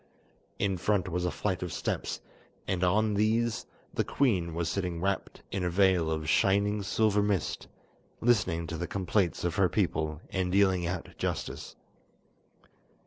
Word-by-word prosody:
In 95 -2 0
front 95 0 +1
was 90 +1 -1
a - - +2
flight 95 0 -2
of 90 -2 -3
steps, - - -3 0.5
and 95 -1 0
on 105 +4 +3
these 110 +3 +1 0.3
the - - +1
queen 90 -12 +1
was 85 -1 -1
sitting 90 -1 -2
wrapped 95 +2 -2
in 95 -2 -1
a 90 - +1
veil 90 -2 +3
of 80 -1 -2
shining 100 +5 +3
silver 105 +1 +2
mist, 100 -5 -1 0.5
listening 95 -8 +2
to 80 0 -5
the 85 - -3
complaints 95 -2 0
of 85 -2 -1
her 95 -3 +4
people 80 -6 0
and 95 -2 0
dealing 95 -3 +3
out 90 -1 -3
justice. - - -3
95 Hz, 150 wpm, -29 LUFS, 85-100 Hz, 0.5 s, her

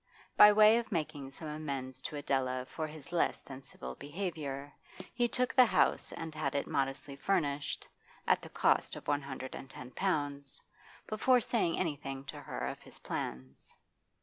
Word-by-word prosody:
By 210 - +10
way 215 +2 +7
of 235 - -6
making 150 -5 -2
some 155 +3 -6
amends 140 -4 -4
to - - -8
Adela 130 -3 0
for 155 +3 -4
his 155 +1 -10
less 175 - +1
than 135 -1 -10
civil 65 - -8
behaviour, 145 - -5 0.4
he 240 -1 +2
took 250 +2 0
the 255 -2 +7
house - - +2
and 165 -1 -5
had 150 -3 -2
it 140 - +1
modestly 135 0 -2
furnished 145 -3 0 0.4
(at - - +3
the - - -9
cost - - +2
of - - -10
one 145 0 +2
hundred 130 -1 -6
and 135 - -8
ten 125 -1 -9
pounds) 145 -7 -1 0.5
before 250 +4 +4
saying 215 -7 +1
anything 140 -5 -3
to - - -7
her - - -4
of - - -4
his - - -13
plans. 65 +1 -6
145 Hz, 170 wpm, -33 LUFS, 135-175 Hz, 0.5 s, By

